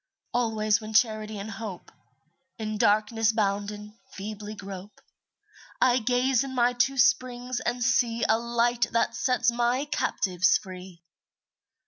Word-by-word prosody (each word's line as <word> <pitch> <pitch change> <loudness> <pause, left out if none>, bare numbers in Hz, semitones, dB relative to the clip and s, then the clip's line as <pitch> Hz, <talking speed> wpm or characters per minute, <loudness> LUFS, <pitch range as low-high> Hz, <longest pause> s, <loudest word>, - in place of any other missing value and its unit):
Always 220 -3 +1
when 215 0 -7
Charity 215 -1 +1
and 200 +2 -6
Hope, 200 -3 -8 0.7
In 215 -2 -4
darkness 215 +2 +3
bounden, 210 0 -3
feebly 210 +1 -7
grope, 195 0 -9 0.8
I 255 0 +4
gaze 250 +2 +1
in 265 -1 -6
my 245 0 +3
two 265 +2 +1
springs 250 -1 +1
and 245 0 -2
see 235 -2 +2
A 220 +1 +3
Light 235 +1 +1
that 230 - +1
sets 250 -1 +1
my 240 +3 0
captives 185 - +1
free. 185 -2 -11
225 Hz, 125 wpm, -27 LUFS, 210-245 Hz, 0.8 s, I